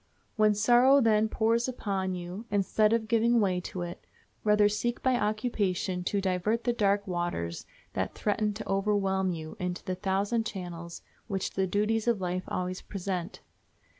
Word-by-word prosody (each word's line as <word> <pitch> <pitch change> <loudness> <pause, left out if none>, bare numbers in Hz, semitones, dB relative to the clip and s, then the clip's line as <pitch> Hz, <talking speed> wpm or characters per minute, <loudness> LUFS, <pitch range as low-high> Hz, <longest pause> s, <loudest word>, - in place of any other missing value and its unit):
When 215 -1 +4
sorrow, 245 +6 +5
then, 220 -3 +3
pours 230 +3 +1
upon 195 -7 -2
you, 180 +5 -6
instead 205 +2 +2
of 225 -1 +1
giving 235 +1 +3
way 185 -4 +2
to 180 0 -5
it, 175 0 -7 0.4
rather 210 -1 +5
seek 215 +3 -2
by 260 -1 +3
occupation 210 -5 -1
to 200 - 0
divert 195 +4 0
the 240 - +1
dark 200 -2 +2
waters 175 - -3 0.3
that 95 0 -2
threaten 210 0 0
to 220 - -6
overwhelm 195 -1 +1
you 160 -2 -6
into 180 -1 -3
the 185 - -1
thousand 200 +5 0
channels 170 -4 -7 0.2
which 195 -3 -2
the 190 0 0
duties 210 +4 0
of 235 -4 +2
life 185 0 -2
always 185 0 -3
present. 185 -1 -4
200 Hz, 160 wpm, -29 LUFS, 185-220 Hz, 0.4 s, sorrow